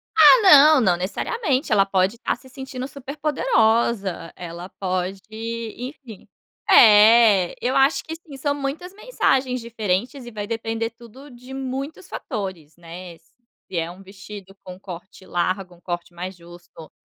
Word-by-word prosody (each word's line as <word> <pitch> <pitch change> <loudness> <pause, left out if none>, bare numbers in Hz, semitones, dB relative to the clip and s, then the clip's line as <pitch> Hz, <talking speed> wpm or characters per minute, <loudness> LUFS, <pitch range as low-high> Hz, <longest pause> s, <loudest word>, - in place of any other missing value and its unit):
Ah, - - +8
não, 300 -5 +8
não 180 -6 +2
necessariamente, 270 - -2
ela 200 -2 +4
pode 195 +1 +1
estar 235 - -2
se 260 +2 -18
sentindo 260 0 -7
super 280 +1 -9
poderosa, 225 - 0
ela 175 +1 -8
pode, 185 0 -3 0.6
enfim 250 -4 -10 0.4
É, 210 -3 +6
eu 255 - 0
acho 270 +3 +3
que 320 - -7
sim, 325 -3 -13
são 285 +2 -1
muitas 290 +6 -5
mensagens 265 - 0
diferentes 230 +3 -3
e 240 - -9
vai 210 -2 -5
depender 225 0 -3
tudo 240 +5 -15
de 250 +2 -12
muitos 270 +2 -6
fatores, 190 - -6
né, 170 0 -10
se 190 +2 -13
é 165 0 -1
um 185 +3 -12
vestido 195 0 -12
com 185 -1 -10
corte 190 0 -11
largo, 185 +1 -2
um 170 - -24
corte 175 -1 -6
mais 180 +2 -7
justo, 175 -2 -15
220 Hz, 150 wpm, -22 LUFS, 185-265 Hz, 0.6 s, Ah